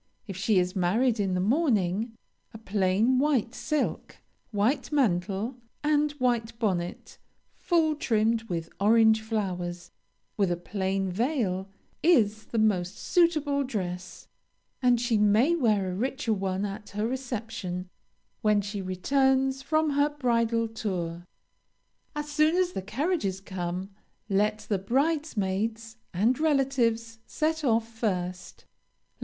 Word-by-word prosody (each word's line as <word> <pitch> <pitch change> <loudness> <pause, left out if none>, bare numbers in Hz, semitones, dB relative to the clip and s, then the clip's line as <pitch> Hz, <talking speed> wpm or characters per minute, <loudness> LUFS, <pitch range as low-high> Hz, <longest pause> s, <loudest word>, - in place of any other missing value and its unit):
If 195 -4 -7
she 195 +2 +1
is 180 +1 +1
married 220 +6 +2
in 190 -2 0
the - - 0
morning, 220 - +1 0.4
a - - -5
plain 210 +4 +2
white 265 -5 +1
silk, 305 +3 -2 0.3
white 235 +8 0
mantle, 210 -2 0 0.3
and 300 0 +2
white 240 -4 -1
bonnet, 185 -6 -3 0.3
full 325 -3 +1
trimmed 225 -5 +1
with 165 -2 -3
orange 220 +1 +5
flowers, 180 -6 -3 0.5
with 195 -4 +2
a 175 - 0
plain 190 +1 -2
veil, 200 - -1 0.3
is 220 -10 +3
the 230 - -5
most 200 -4 +1
suitable 305 -5 +2
dress, 185 -7 -5 0.5
and 245 -2 +4
she 235 -2 +1
may 215 +10 +4
wear 210 - +1
a - - -4
richer 255 +2 -1
one 190 0 -1
at 205 +1 -6
her 210 - +1
reception, 225 -8 -4 0.5
when 210 -1 +3
she 205 0 -4
returns 265 +8 +1
from 310 +2 +1
her 285 +1 +3
bridal 230 -5 +1
tour. 175 -6 -4 0.9
As 295 0 -3
soon 305 +2 +2
as 365 -1 +2
the 190 - -4
carriages 220 - -1
come, 185 0 -5 0.4
let 210 +1 +1
the 200 -3 0
bridesmaids, 225 - -1
and 220 +9 +1
relatives 250 -7 +1
set 315 0 -1
off 230 -3 +2
first. 185 -6 -4
220 Hz, 125 wpm, -27 LUFS, 190-265 Hz, 0.9 s, orange